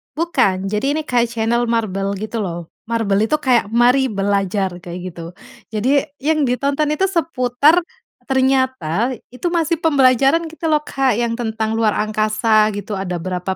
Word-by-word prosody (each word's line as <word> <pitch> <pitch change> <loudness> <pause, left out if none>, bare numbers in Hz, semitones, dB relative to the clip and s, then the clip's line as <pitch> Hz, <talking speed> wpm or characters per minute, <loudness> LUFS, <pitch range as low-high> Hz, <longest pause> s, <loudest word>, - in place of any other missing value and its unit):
Bukan, 195 - 0
jadi 270 +8 0
ini 315 - -1
kayak 245 -5 +1
channel 235 +1 0
MarBel 200 -4 -1
gitu 215 +3 -5
loh. 175 -4 -5 0.2
MarBel 220 -2 +1
itu 305 - +2
kayak, 255 -7 +2
"mari 245 +4 +3
belajar" 195 -3 -1
kayak 175 0 -8
gitu. 170 0 -9 0.5
Jadi 260 +8 +1 0.2
yang 305 -2 +2
ditonton 280 +4 0
itu 300 +5 0
seputar 310 -1 +2 0.4
ternyata 260 - +1 0.2
itu 255 +8 -4
masih 335 -2 0
pembelajaran 275 +1 +3
gitu 325 0 -4
loh, 305 - +4
Kak, 270 -5 0
yang 235 0 -1
tentang 220 -1 -2
luar 220 -2 +1
angkasa 215 0 +2
gitu 205 +1 -5
ada 190 -2 -3
berapa 185 +1 -3
235 Hz, 150 wpm, -19 LUFS, 205-275 Hz, 0.5 s, loh